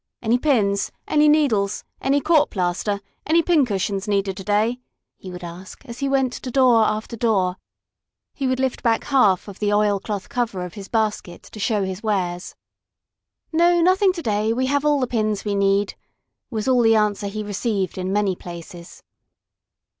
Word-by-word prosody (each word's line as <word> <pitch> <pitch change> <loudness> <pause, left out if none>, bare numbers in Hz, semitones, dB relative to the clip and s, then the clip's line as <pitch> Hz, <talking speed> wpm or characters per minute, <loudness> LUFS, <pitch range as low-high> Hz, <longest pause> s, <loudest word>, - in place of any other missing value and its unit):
"Any 235 +2 +2
pins? 210 -9 +1 0.2
Any 300 0 +4
needles? 225 -10 +2 0.2
Any 275 +2 +2
court 310 -2 +3
plaster? 190 +2 -2 0.3
Any 330 +2 +4
pin 310 -6 +3
cushions 195 -1 -2
needed 195 -2 0
to 190 - -7
day?" 215 +5 +1 0.4
he 190 - -11
would 180 0 -8
ask, 175 +2 -10
as 235 0 -9
he 275 - -1
went 265 -2 +1
to 255 - -6
door 245 -3 +4
after 215 +2 -2
door. 195 -6 +1 0.8
He 275 - -2
would 255 0 0
lift 265 -1 -1
back 230 -1 +1
half 210 -11 +2
of 200 - -10
the 205 -1 0
oilcloth 205 -1 0
cover 225 -7 -2
of 175 - -9
his 200 -2 -9
basket 215 -6 -2
to 215 - -12
show 210 -1 0
his 190 +1 -4
wares. 185 -5 -2 1.0
"No, 345 +2 +4
nothing 370 +3 +4
to 340 -3 -6
day! 215 -1 0
We 255 +2 0
have 285 +2 0
all 295 -1 +3
the 255 - +1
pins 215 -4 -1
we 205 - -1
need," 200 0 +1 0.6
was 220 -2 -3
all 255 -2 +4
the 225 -1 +4
answer 210 -1 +1
he 215 +1 -4
received 205 -2 -2
in 185 +1 -2
many 200 -2 +1
places. 170 0 -11
215 Hz, 175 wpm, -22 LUFS, 195-255 Hz, 1.0 s, Any